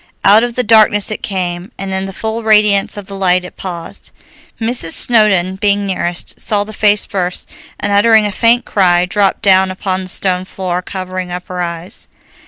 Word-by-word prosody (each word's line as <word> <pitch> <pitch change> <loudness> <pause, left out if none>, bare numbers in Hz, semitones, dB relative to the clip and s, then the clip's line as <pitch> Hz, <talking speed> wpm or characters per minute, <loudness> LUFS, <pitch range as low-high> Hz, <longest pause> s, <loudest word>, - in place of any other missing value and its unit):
Out 210 +3 +5
of 240 -1 -3
the 250 - 0
darkness 215 -2 +4
it 215 - -4
came, 180 0 -4
and 195 -1 -5
in 190 0 -3
the - - -6
full 220 +4 -4
radiance 210 -2 +2
of 205 - -7
the 195 - -10
light 185 -2 +1
it - - -12
paused. 175 -3 -8 0.5
Mrs. 225 -8 0
Snowdon, 195 -6 +3
being 200 0 0
nearest, 175 -2 -3
saw 210 -3 +1
the 215 +1 -10
face 210 -1 +2
first, 180 -2 -4 0.3
and 205 - -2
uttering 220 +1 +4
a 205 - -2
faint 235 +4 +2
cry 180 -3 +2
dropped 195 +2 0
down 190 -1 +4
upon 185 0 -3
the 185 - -7
stone 185 0 +1
floor, 180 -2 -4
covering 185 -1 -6
up 180 0 -6
her 180 -1 -4
eyes. 170 +4 -6
195 Hz, 190 wpm, -14 LUFS, 185-210 Hz, 0.5 s, Out